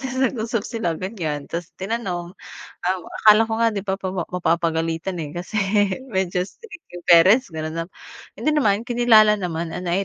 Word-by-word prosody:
tapos 260 -1 -4
nag-usap 230 -4 -1
sila 225 -8 -2
ganyan. 160 -7 -4
Tapos 170 -1 -5
tinanong, 190 -4 -3 0.5
um, 185 +1 0 0.2
akala 215 +1 +7
ko - - -4
nga 230 - +4
di 200 - -3
ba 190 -1 -1
pawa 185 -2 -3
mapapagalitan, 165 0 -1
eh, 150 - -5
kasi 190 +5 -4 0.5
medyo 190 -2 0
strict 420 -7 -14
yung 175 - -9
parents 190 +9 +6
gano'n 155 0 -4
'no. - - -14 0.5
Hindi 305 0 +1
naman. 215 -6 +2
Kinilala 225 -3 +5
naman 170 -3 -3
and 180 - -5
I 185 +3 +1
190 Hz, 165 wpm, -22 LUFS, 170-225 Hz, 0.5 s, akala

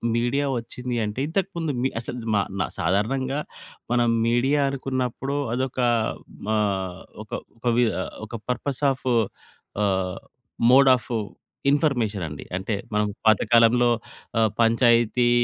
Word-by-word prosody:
Media 120 +5 +1
వచ్చింది 125 +1 -5
అంటే 105 +5 -4
ఇంతకు 190 +3 -1
ముందు 160 -3 -1
మీ 130 - +2
అసలు 120 +1 -6 0.2
మా 100 - +4 0.2
న - - +1
సాధారణంగా 130 - 0 0.5
మనం 120 -1 +3 0.2
మీడియా 130 +5 +2
అనుకున్నప్పుడు 135 0 -2 0.2
అదొక 130 0 -2 0.8
ఆహ్, 95 -3 -1 0.2
ఒక - - -23 0.3
ఒక 120 - -16
వి 125 - +5 0.4
ఒక 110 - -14 0.2
పర్పస్ 130 +3 -2
ఆఫ్ 130 - -7 0.8
ఆహ్, 95 -2 0 0.5
మోడ్ 135 +1 +7
ఆఫ్ 120 - -8 0.6
ఇన్‌ఫర్మేషన్ 120 - +1
అండి. 75 -1 -7
అంటే 100 +3 -3 0.2
మనం 105 0 +2 0.2
పాతకాలంలో 115 +2 +5 0.5
ఆ - - +4 0.2
పంచాయతీ, 120 0 +4
120 Hz, 120 wpm, -24 LUFS, 105-130 Hz, 0.8 s, మోడ్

